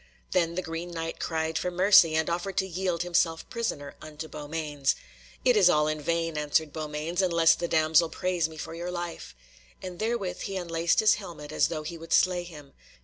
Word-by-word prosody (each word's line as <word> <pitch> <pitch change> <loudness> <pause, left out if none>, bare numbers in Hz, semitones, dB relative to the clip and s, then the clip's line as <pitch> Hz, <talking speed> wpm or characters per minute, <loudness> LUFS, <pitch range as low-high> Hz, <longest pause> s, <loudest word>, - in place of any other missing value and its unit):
Then 170 -2 +1
the 185 - -2
Green 165 +2 -5
Knight 165 -1 -5
cried 160 -1 -1
for 180 - -1
mercy, 180 -3 +6
and 160 0 +1
offered 175 +3 -3
to 190 - +2
yield 180 -1 -2
himself 170 -2 0
prisoner 185 -12 -3
unto 155 0 -8
Beaumains. 150 -2 -2 0.5
"It 250 - +5
is 195 -4 +6
all 150 -3 +3
in 155 0 -2
vain," 165 0 -1
answered 150 0 0
Beaumains, 155 +3 -2
"unless 170 -3 +4
the 170 - -3
damsel 160 0 +3
prays 175 -2 -1
me 160 - -12
for 160 - -6
your 170 +2 -5
life," 175 - -6 0.4
and 180 -2 -8
therewith 215 -5 -2
he 195 -1 -4
unlaced 170 0 +1
his 215 - +6
helmet 155 -6 -9
as - - +2
though 155 -2 -4
he 165 +2 -6
would 165 0 -4
slay 180 -1 +3
him. 150 -5 -12
165 Hz, 195 wpm, -27 LUFS, 155-180 Hz, 0.5 s, mercy